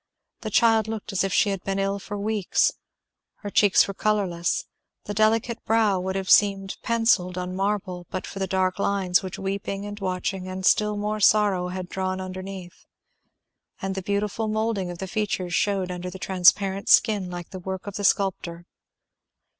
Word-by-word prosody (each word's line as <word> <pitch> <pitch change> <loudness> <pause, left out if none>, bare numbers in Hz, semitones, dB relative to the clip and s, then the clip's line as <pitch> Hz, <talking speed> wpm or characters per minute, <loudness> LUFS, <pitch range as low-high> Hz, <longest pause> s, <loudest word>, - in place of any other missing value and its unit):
The 220 - -5
child 225 0 +3
looked 220 -1 -5
as 195 - +1
if 195 - -1
she 205 - +3
had 195 -2 -4
been 195 0 -2
ill 195 0 -1
for 205 +1 -6
weeks. 205 -2 +1 0.7
Her 205 - -6
cheeks 205 -1 +5
were 195 - -4
colourless; 200 - 0 0.4
the 205 - -5
delicate 220 +2 +1
brow 220 -4 +2
would 190 +1 -3
have 190 -1 -3
seemed 195 -1 +3
pencilled 225 -6 +1
on 180 0 -4
marble 190 -3 -2
but 185 - -4
for 195 - -8
the 190 - -1
dark 185 0 0
lines 195 -3 +1
which 185 -1 -6
weeping 195 +1 -4
and 205 0 -7
watching, 185 0 -3
and 185 0 -5
still 210 +1 +3
more 210 +1 -2
sorrow, 205 -3 +3
had 180 0 -5
drawn 185 0 -3
underneath; 185 -1 -8 0.9
and 195 0 -3
the 190 - -4
beautiful 205 +3 -2
moulding 215 -3 -1
of 175 - -6
the 190 - -5
features 190 -3 -2
shewed 190 -1 0
under 180 0 -5
the 185 - -8
transparent 190 +1 +2
skin 205 -4 +4
like 175 -1 -7
the 185 - -7
work 190 +1 -5
of 205 - -6
the 205 - -4
sculptor. 175 -3 0
195 Hz, 180 wpm, -25 LUFS, 185-205 Hz, 0.9 s, cheeks